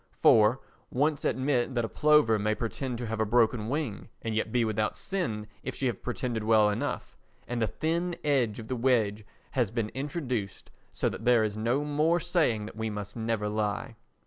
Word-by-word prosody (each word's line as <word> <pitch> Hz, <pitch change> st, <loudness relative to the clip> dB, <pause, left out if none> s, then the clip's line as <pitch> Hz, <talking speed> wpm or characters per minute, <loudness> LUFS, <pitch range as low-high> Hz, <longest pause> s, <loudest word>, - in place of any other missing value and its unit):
For, 110 Hz, +4 st, +6 dB, 0.3 s
once 145 Hz, +3 st, +1 dB
admit 130 Hz, -1 st, 0 dB
that 120 Hz, -1 st, +1 dB
a -, -, -2 dB
plover 150 Hz, -6 st, +4 dB
may 105 Hz, +1 st, +1 dB
pretend 120 Hz, +2 st, -3 dB
to 120 Hz, -, -4 dB
have 110 Hz, 0 st, -3 dB
a -, -, +3 dB
broken 110 Hz, 0 st, +2 dB
wing 140 Hz, -7 st, -3 dB
and 115 Hz, -, -2 dB
yet 110 Hz, 0 st, -1 dB
be 120 Hz, -1 st, +2 dB
without 110 Hz, -1 st, 0 dB
sin 115 Hz, -, -2 dB, 0.2 s
if 130 Hz, -, -5 dB
she 135 Hz, -, -2 dB
have 120 Hz, -5 st, -1 dB
pretended 120 Hz, -2 st, -2 dB
well 110 Hz, -1 st, +5 dB
enough, 105 Hz, -, -3 dB, 0.3 s
and 120 Hz, -1 st, -2 dB
the 110 Hz, -, +2 dB
thin 170 Hz, +5 st, -1 dB
edge 130 Hz, -8 st, +1 dB
of 110 Hz, -, -7 dB
the 130 Hz, -, -2 dB
wedge 115 Hz, -4 st, +1 dB, 0.3 s
has 125 Hz, -6 st, +1 dB
been 115 Hz, -1 st, -2 dB
introduced 130 Hz, -, -4 dB, 0.2 s
so -, -, -1 dB
that 115 Hz, -, -4 dB
there 120 Hz, -2 st, +5 dB
is 105 Hz, -1 st, -1 dB
no 120 Hz, +7 st, 0 dB
more 155 Hz, +4 st, +2 dB
saying 125 Hz, -, +1 dB
that 110 Hz, -, -9 dB
we 110 Hz, 0 st, -2 dB
must 105 Hz, -1 st, -6 dB
never 110 Hz, -2 st, -1 dB
lie. 105 Hz, +3 st, -2 dB
115 Hz, 195 wpm, -29 LUFS, 110-135 Hz, 0.3 s, For